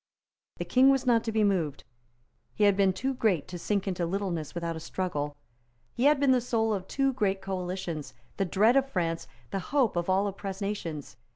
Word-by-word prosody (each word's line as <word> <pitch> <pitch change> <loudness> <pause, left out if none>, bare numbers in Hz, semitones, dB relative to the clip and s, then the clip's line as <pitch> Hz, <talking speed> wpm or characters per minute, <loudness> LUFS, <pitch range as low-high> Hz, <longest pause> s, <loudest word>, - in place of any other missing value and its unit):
The - - -3
King 260 +1 +5
was 270 -1 +2
not 235 -2 +3
to 225 - -1
be 215 -1 +2
moved. 180 -8 0 0.7
He 215 - +1
had 200 -1 +5
been 195 -1 +4
too 265 +8 -2
great 215 - +1
to 175 - -6
sink 200 +2 -1
into 180 -2 -1
littleness 175 -4 -2
without 170 -1 -2
a - - -5
struggle. 150 -5 -3 0.6
He 245 - 0
had 295 -1 +5
been 280 -2 +4
the 255 -1 +4
soul 225 -2 0
of 190 -2 -4
two 270 -1 +1
great 200 -6 0
coalitions, 185 -4 -4 0.2
the 195 - +1
dread 215 +7 +3
of 270 0 +3
France, 165 -6 -2 0.2
the 195 - -1
hope 255 +2 +1
of 175 +1 -1
all 190 +2 +3
oppressed 195 0 -4
nations. 165 -10 -4
195 Hz, 200 wpm, -28 LUFS, 175-230 Hz, 0.7 s, King